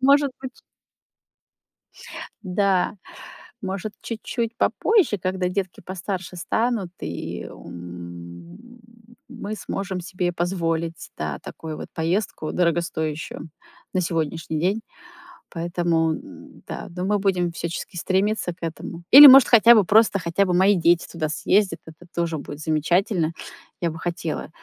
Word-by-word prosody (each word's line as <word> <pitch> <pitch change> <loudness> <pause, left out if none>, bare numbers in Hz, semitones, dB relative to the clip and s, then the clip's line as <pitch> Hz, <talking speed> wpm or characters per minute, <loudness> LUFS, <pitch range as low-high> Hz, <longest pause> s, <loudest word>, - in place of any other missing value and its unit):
может 280 +1 +4
быть 260 -1 -8 1.8
Да, 195 0 +1 0.7
может, 195 +2 -4
чуть-чуть 230 0 -4
попозже, 410 - +2
когда 185 0 -1
детки 185 -1 -3
постарше 185 0 -5
станут, 220 +1 -1
и, - - -5
м, 85 - -10 0.5
мы 220 -4 -6
сможем 195 -3 -4
себе 180 0 -2
позволить, 165 -2 -2
да, 75 -2 -3
такую 155 -1 -8
вот - - -7
поездку 165 0 -2
дорогостоящую 165 -2 -2 0.4
на 185 - +1
сегодняшний 160 -2 -2
день. 195 +6 0 0.7
Поэтому, 170 -1 0
н-да, 280 - -10
но 180 - -3
мы 205 +2 +1
будем 185 -3 0
всячески 170 +1 -5
стремиться 190 +2 0
к 175 - -36
этому. 165 +1 -6
Или, 290 +2 +13
может, 265 -1 +9
хотя 235 0 +8
бы 210 -4 +5
просто, 215 +1 +4
хотя 170 +3 +1
бы 180 - 0
мои 190 +3 +5
дети 170 -1 +3
туда 160 -2 -2
съездят. 190 +3 +1
Это 160 +2 -14
тоже 170 -2 -1
будет 145 0 -8
замечательно. 165 +2 +1 0.5
Я 170 - 0
бы 160 - -8
хотела, 170 -3 -4
180 Hz, 125 wpm, -23 LUFS, 165-205 Hz, 1.8 s, Или